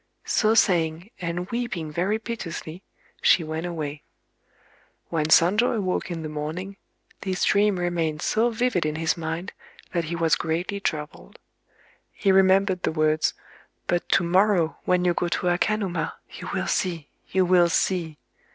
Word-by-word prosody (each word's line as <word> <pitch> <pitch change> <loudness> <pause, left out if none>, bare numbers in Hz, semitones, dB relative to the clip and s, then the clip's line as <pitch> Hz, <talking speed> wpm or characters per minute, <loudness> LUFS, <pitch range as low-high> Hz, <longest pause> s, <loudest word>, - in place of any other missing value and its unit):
So 225 - +2
saying, 170 -1 +2
and 175 +1 -3
weeping 195 -10 -3
very 185 +7 0
piteously, 185 -7 -6 0.4
she 170 - +5
went 160 +2 -4
away. 150 -4 -5 1.1
When 160 -3 0
Sonjō 205 +10 +4
awoke 190 -4 -1
in 165 -2 -4
the - - -3
morning, 160 +6 -5 0.4
this 190 -1 -2
dream 205 -1 +3
remained 165 -3 -1
so 230 +2 +2
vivid 235 -5 0
in 155 0 -2
his 160 0 0
mind 165 +3 -4 0.4
that 170 -2 -1
he 170 +2 -3
was 165 -2 +1
greatly 175 +5 -2
troubled. 150 -6 -5 0.8
He 195 - +1
remembered 190 0 +4
the - - 0
words:—"But 155 +2 -2
to - - +4
morrow, 180 -1 +2
when 180 0 +2
you 175 - +3
go 175 - -1
to 175 +1 -1
Akanuma, 190 +1 0 0.2
you - - -8
will - - -1
see,—you 180 +1 -1
will 175 -1 +4
see." 165 -3 0
175 Hz, 140 wpm, -25 LUFS, 160-195 Hz, 1.1 s, she